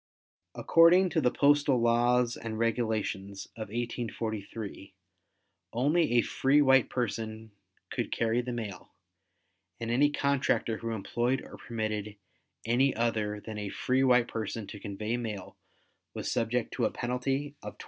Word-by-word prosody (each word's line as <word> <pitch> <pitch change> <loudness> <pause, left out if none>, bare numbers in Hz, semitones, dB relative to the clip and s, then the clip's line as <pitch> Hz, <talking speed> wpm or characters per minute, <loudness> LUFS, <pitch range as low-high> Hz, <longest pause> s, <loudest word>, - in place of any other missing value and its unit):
According 175 +3 +5
to 165 - +1
the 125 - +4
Postal 145 -1 +3
Laws 120 +1 +3
and 110 -1 -5
Regulations 110 -4 -1
of 110 -2 -6
1843, 110 -3 -5 0.8
only 150 +4 +2
a 120 -2 +5
free 135 +2 +2
white 135 -3 +5
person 110 -2 -3 0.4
could - - -3
carry 115 +1 +1
the 125 0 -5
mail 110 -6 -6 0.9
and 115 0 -3
any 140 +5 +4
contractor 140 -5 0
who 115 - -5
employed 120 +4 -1
or - - -11
permitted 110 -2 -4 0.5
any 130 +4 +2
other 110 -2 -1
than 110 -1 -6
a 105 -1 -4
free 130 +6 +1
white 125 -2 +4
person 110 -1 -4
to 105 - -8
convey 105 +4 -3
mail 105 -6 -5 0.6
was - - -3
subject 115 +1 -1
to - - 0
a - - +2
penalty 135 +4 -2
of - - -8
$20. - - -43
115 Hz, 140 wpm, -29 LUFS, 110-130 Hz, 0.9 s, According